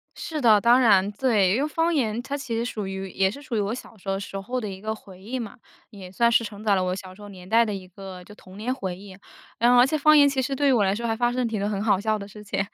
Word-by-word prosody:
是 315 -4 -5
的， 220 -4 +6
当 240 +4 +5
然， 205 -4 +4
对。 210 -5 +2
因 265 - 0
为 300 - 0
方 330 +2 0
言 235 -5 0
它 280 +3 -5
其 240 -4 -4
实 230 +1 -1
属 210 -5 -4
于 190 0 -5
也 190 0 +1
是 280 +8 -9
属 275 -6 -5
于 - - +1
我 205 +2 -1
小 240 - -9
时 195 0 -8
候 195 0 -1
时 195 -1 -6
候 250 +6 -3
的 215 - -5
一 190 0 -9
个 220 0 -2
回 190 -3 -15
忆 240 +6 -5
嘛， 225 +1 -7 0.3
也 190 -4 -11
算 235 +4 +2
是 235 0 +3
承 210 -1 -8
载 205 -2 +3
了 185 - +1
我 185 0 -1
小 185 -1 -9
时 210 - -16
候 205 - -10
年 185 -2 -12
代 230 +2 +4
的 210 - -3
一 185 -2 -7
个 185 0 -10
就 210 - -14
童 185 -1 -15
年 245 +4 -2
回 190 -9 -5
忆。 195 -1 -12 0.4
然 240 +1 +4
后 245 - +5
而 245 - +7
且 310 +3 0
方 305 +1 +5
言 285 -1 +7
其 270 -1 0
实 270 +1 -2
对 285 +1 +1
于 - - +5
我 225 -5 +3
来 195 +1 +1
说 235 +2 -4
还 225 - 0
发 240 +1 +1
生 255 - -3
了 - - 0
挺 210 -3 -2
很 205 0 -2
好 200 -4 +2
笑 215 +1 0
的 200 -1 -8
事 210 +1 -12
情， 200 -1 -3
215 Hz, 350 characters per minute, -24 LUFS, 195-245 Hz, 0.4 s, 而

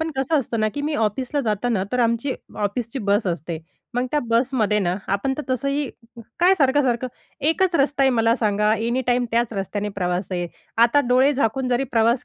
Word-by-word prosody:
पण 320 0 -1
कसं 270 +4 +1
असतं 230 -2 -3
ना 215 - +2
की 290 - -3
मी 300 +1 -1
ऑफिसला 255 +5 -1
जातांना 215 -1 0
तर 250 - 0
आमची 235 +3 +1 0.3
ऑफिसची 230 +5 -2
बस 205 +1 +2
असते. 170 -1 -3 0.4
मग 245 +1 0
त्या 300 - +1
बसमध्ये 230 -3 +2
ना 180 -3 0 0.2
आपण 235 +7 0
तर 300 - -2
तसंही 275 +2 0 0.5
काय 370 +2 +6
सारखं-सारखं 265 -5 +2 0.4
एकच 370 +2 +1
रस्ता 280 0 +2
आहे. 265 - +5
मला 230 -1 +3
सांगा 210 -2 +2
एनी 235 +3 0
टाईम 245 0 +2
त्याच 235 0 +1
रस्त्याने 205 +1 -3
प्रवास 180 0 -1
आहे. 175 -1 -2 0.3
आता 235 +5 +5
डोळे 260 +3 +4
झाकून 255 0 0
जरी 250 +2 +1
प्रवास 230 +2 +3
240 Hz, 185 wpm, -22 LUFS, 210-270 Hz, 0.5 s, काय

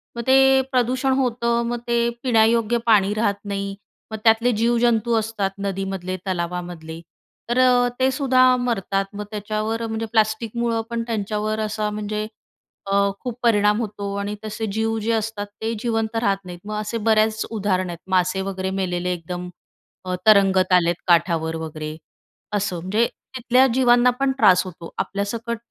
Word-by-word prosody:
मग 235 - -3
ते 265 0 +6
प्रदूषण 255 +1 +1
होतं, 235 -2 +1
मग 240 0 -2
ते 235 0 +2
पिण्यायोग्य 230 -1 +3
पाणी 205 -3 +4
राहत 205 -2 -1
नाही. 200 -1 -3 0.4
मग 220 - -4
त्यातले 230 +2 +4
जीवजंतू 235 -1 +2
असतात, 210 -3 -2
नदीमधले, 195 -2 -3
तलावामधले, 175 -2 -4 0.5
तर 240 +2 +1 0.4
ते 260 0 +3
सुद्धा 255 -2 +4
मरतात. 200 -5 -1
मग 205 0 -5
त्याच्यावर, 215 +2 -3
म्हणजे 225 0 -3
प्लास्टिकमुळं 225 +1 0
पण 235 -1 -2
त्यांच्यावर 215 0 -2
असा, 215 0 -2
म्हणजे 210 0 -3 0.6
अ, - - +1 0.3
खूप 245 - -4
परिणाम 210 -1 +3
होतो 205 -2 -5
आणि 205 +1 -3
तसे 215 +1 -4
जीव 225 0 0
जे 220 +2 -1
असतात, 220 -2 -2
ते 225 +1 -1
जिवंत 225 -1 -1
राहत 200 -4 +2
नाहीत. 175 -1 -8
मग 215 - -4
असे 215 +2 -3
बऱ्याच 220 0 +2
उदाहरण 190 -4 -1
आहेत, 170 -1 -7
मासे 185 +1 +1
वगैरे 190 -1 -3
मेलेले, 180 -1 -1
एकदम 180 +1 -6 0.6
अ, 185 0 -2
तरंगत 195 -3 +5
आलेत, 175 -1 +4
काठावर 170 -2 +2
वगैरे. 155 -1 -6 0.6
असं, 200 -3 -1
म्हणजे 205 +7 +1 0.3
तिथल्या 250 +2 +4
जीवांना 245 -1 +4
पण 275 0 +2
त्रास 180 -6 +6
होतो, 170 -2 -9
आपल्यासकट. 225 +4 -3
215 Hz, 145 wpm, -22 LUFS, 190-235 Hz, 0.6 s, ते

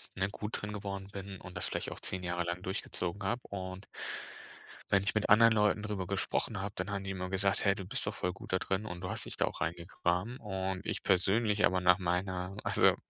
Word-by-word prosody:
ne, 95 +1 +1
gut 105 +2 -2
drin 105 0 -4
geworden 100 -1 -4
bin 95 -1 -6
und 90 - -10
das - - +1
vielleicht - - -3
auch - - -6
10 95 -1 +1
Jahre 85 0 -1
lang 85 +1 -3
durchgezogen 95 0 -2
habe. 120 +6 0
Und 95 0 -5 1.1
wenn 100 -1 +5
ich 100 - +1
mit 110 - +1
anderen 115 +2 +8
Leuten 105 -1 +3
drüber 100 -4 -3
gesprochen 100 -3 0
habe, 100 0 -4
dann 95 +2 -2
haben 100 -1 -2
die 95 - -5
immer 90 -1 -4
gesagt: 95 +1 +2
„Hey, 100 - +5
du 100 - -5
bist - - 0
doch - - 0
voll 90 - -1
gut 95 - -8
da - - +5
drin 95 +3 -1
und 90 -4 -6
du 90 - -4
hast - - -1
dich - - -4
da - - +1
auch - - -5
rein 85 - 0
gegraben.“ 90 +6 -2
Und 95 -2 -3
ich - - -2
persönlich 105 +3 +4
aber, 95 0 +2
nach 90 +1 +6
meiner 90 +1 -1
also, - - +5
95 Hz, 235 wpm, -32 LUFS, 90-100 Hz, 1.1 s, anderen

